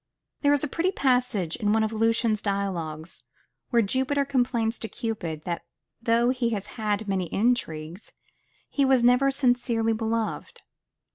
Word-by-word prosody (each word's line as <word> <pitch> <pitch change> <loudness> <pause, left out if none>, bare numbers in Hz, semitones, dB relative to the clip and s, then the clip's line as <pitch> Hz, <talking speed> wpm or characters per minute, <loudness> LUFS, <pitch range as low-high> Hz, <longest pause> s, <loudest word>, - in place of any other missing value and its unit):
There 285 - +4
is 290 -1 +2
a - - 0
pretty 340 +6 0
passage 250 - +1
in 210 -3 +1
one 220 0 +3
of 220 +1 -1
Lucian's 225 -1 +1
dialogues, 175 -6 -3 0.5
where 235 -2 +3
Jupiter 265 +6 0
complains 240 -4 0
to 225 - -3
Cupid 175 -9 -4
that 170 -1 -4 0.4
though 235 +1 +3
he 250 -2 0
has 200 - -7
had 215 -3 -1
so - - -7
many 190 -2 0
intrigues, 180 -6 -1 0.6
he 280 - 0
was 265 -2 +4
never 250 +3 +5
sincerely 245 -4 +1
beloved. 230 - -3
230 Hz, 150 wpm, -26 LUFS, 200-255 Hz, 0.6 s, never